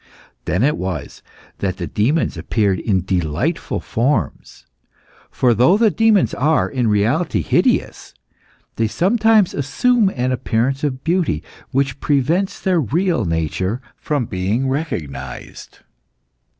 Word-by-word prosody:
Then 95 +6 0
it 150 +3 +2
was 95 -1 -5 0.4
that 95 -2 -2
the - - -4
demons 135 +11 0
appeared 100 -5 0
in 95 -5 0
delightful 85 -6 -1
forms. 115 - -2 0.6
For 125 -2 +2
though 125 - +4
the 220 -1 +3
demons 220 -4 +3
are, 155 +3 +2
in 125 -4 -1
reality, 110 - +1
hideous, - - 0 0.6
they 115 - +1
sometimes 210 - +3
assume 220 - +2
an 125 0 0
appearance 130 +2 -1
of 135 -2 -2
beauty 170 - 0 0.3
which 135 0 -1
prevents 155 +7 0
their 185 -3 +1
real 165 - 0
nature 85 - -1 0.2
from 145 -5 -2
being 105 +7 -1
recognised. 75 - -5
130 Hz, 120 wpm, -19 LUFS, 100-165 Hz, 0.6 s, though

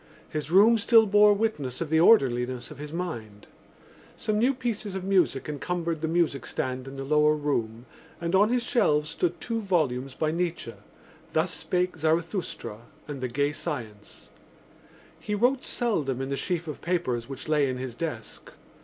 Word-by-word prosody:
His 155 0 -4
room 215 +6 +6
still 225 +1 +6
bore 210 0 +6
witness 150 - -2
of 165 - -3
the 160 - +4
orderliness 130 - +3
of 145 - -11
his 150 0 -7
mind. 115 - -5 0.7
Some 210 -1 -1
new 250 +4 +4
pieces 225 -5 -3
of 190 - -4
music 185 -8 +1
encumbered 165 +2 -3
the 160 - 0
music 165 -4 0
stand 130 0 -3
in 135 - -8
the 135 - -5
lower 150 +2 +3
room 120 -6 -2 0.3
and 170 0 -3
on 205 +3 +5
his 245 0 +1
shelves 155 - +2
stood 175 +1 -1
two 230 -1 -3
volumes 135 - 0
by 155 -1 0
Nietzsche: 170 -8 -2 0.6
Thus 165 +3 +1
Spake 180 -1 -1
Zarathustra 160 - -1 0.3
and 145 -3 -6
The 130 - -1
Gay 140 +4 0
Science. 120 -10 -7 0.9
He 210 - -3
wrote 250 +5 +2
seldom 155 - -1
in 135 0 -3
the 140 - -1
sheaf 170 +2 -2
of 150 - -6
papers 140 -9 -1
which 135 +2 -7
lay 150 -3 +2
in 130 - -3
his 125 -2 -5
desk. 120 -8 -6
160 Hz, 170 wpm, -27 LUFS, 135-190 Hz, 0.9 s, room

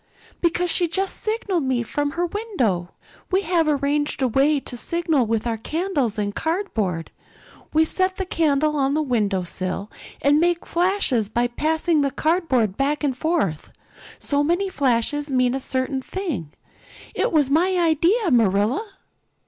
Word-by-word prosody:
"Because 350 0 +1
she 350 - +2
just 385 +4 0
signaled 425 -5 -1
to 270 - -3
me 250 -2 +1
from 285 +4 -2
her 350 +1 0
window. 270 - -1 0.4
We 380 +1 +2
have 335 -2 +1
arranged 290 0 0
a - - +4
way 280 +5 +2
to 260 - -4
signal 315 -2 0
with 225 0 -1
our 230 -1 -1
candles 295 - -2
and 205 -1 -1
cardboard. 220 - -2 0.6
We 315 +1 +4
set 370 +3 0
the 380 - -2
candle 305 -3 +1
on 275 0 +1
the 310 - +1
window 210 -8 0
sill 185 +3 -3 0.3
and 290 +2 +3
make 345 +1 +1
flashes 340 - +1
by 240 +2 0
passing 315 +4 +1
the 280 - +1
cardboard 270 - 0
back 290 +2 0
and 275 -3 0
forth. 270 - -1 0.5
So 285 0 0
many 350 +6 +1
flashes 285 0 0
mean 255 -2 +2
a 270 - -1
certain 260 0 -2
thing. 295 - -4 0.6
It - - 0
was 290 -4 +2
my 360 +5 +3
idea, 345 +4 +2
Marilla." 235 - +1
290 Hz, 155 wpm, -22 LUFS, 245-345 Hz, 0.6 s, a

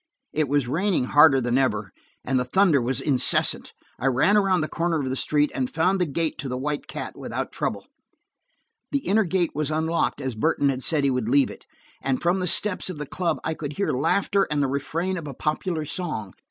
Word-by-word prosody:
It 155 -1 +1
was 145 -3 +1
raining 180 +3 +1
harder 145 +1 +6
than 120 +1 +1
ever, 105 -7 0 0.3
and 130 0 +1
the - - +1
thunder 155 +2 +3
was 130 +2 -1
incessant. 135 -3 +3 0.3
I 130 - 0
ran 135 +11 +3
around 195 -4 +3
the 155 - -1
corner 165 0 -1
of 135 - -2
the - - -1
street, 150 +2 +1
and 130 -2 -2
found 185 +4 +1
the 180 - +2
gate 160 +2 -2
to 135 - -4
the 125 - -3
White 145 +2 -3
Cat - - -6
without - - -5
trouble. - - -3 1.1
The 280 -1 -1
inner 210 +2 +3
gate 175 -1 0
was 150 0 -1
unlocked, 160 +1 0
as 130 -3 -3
Burton 140 +5 +1
had 130 -1 -2
said 150 +1 +2
he 140 - +3
would 125 -3 -1
leave 140 +2 +3
it, - - -14 0.3
and 135 -1 -1
from 175 +2 +1
the 180 - -1
steps 190 +2 +1
of 180 - -6
the 150 - -5
club 170 +2 -2
I 160 - -1
could 150 -2 -6
hear 200 +6 -1
laughter 195 +9 +1
and 145 -1 +1
the - - +1
refrain 165 +7 -2
of 155 - -8
a 140 - -7
popular 155 +2 -2
song. 150 - -3
150 Hz, 220 wpm, -24 LUFS, 135-175 Hz, 1.1 s, harder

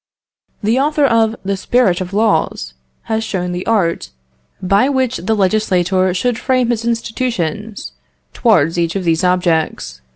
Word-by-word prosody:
The 225 +5 +2
author 295 +1 +2
of 230 -3 +2
the 200 0 0
'Spirit 195 -2 +1
of 180 0 -5
Laws' 200 - 0 0.3
has 220 0 -2
shown 180 -4 -3
the 180 +1 -5
art 195 -7 0 0.5
by 195 +7 +2
which 260 -3 0
the 210 +6 -1
legislator 190 -2 +1
should 235 +4 -1
frame 255 -2 +1
his 230 -1 -2
institutions 225 -4 -3 0.4
towards 175 - +2
each 170 +1 -1
of 195 - -2
these 165 0 +1
objects.... 165 - 0
200 Hz, 140 wpm, -16 LUFS, 180-230 Hz, 0.5 s, The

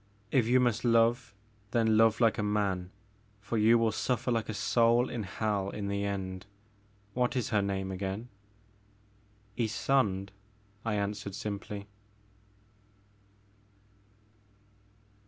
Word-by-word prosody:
If 125 -4 +3
you 125 +2 +4
must 120 -4 +1
love, 115 -1 +2 0.3
then 110 -1 +2
love 110 0 +4
like 115 -3 +3
a - - +2
man, 100 -3 0 0.5
for 115 +3 -5
you 115 +2 +6
will 115 -1 +2
su£kr 125 +2 -1
like 115 -1 -1
a - - -2
soul 115 +3 +3
in 120 - -3
hell, 100 0 -2
in 100 0 -4
the 100 0 -1
end. 95 -1 -4 0.7
What 125 +2 0
is 125 - -1
her 105 -3 +2
name 95 -1 -2
again?" 95 +4 -4 0.4
' 105 0 -34
* 105 -1 -34
Ysonde, 110 -4 +1 0.5
I 115 -2 -1
answered 100 -1 -3
simply. 100 0 -5
105 Hz, 125 wpm, -30 LUFS, 100-115 Hz, 0.7 s, you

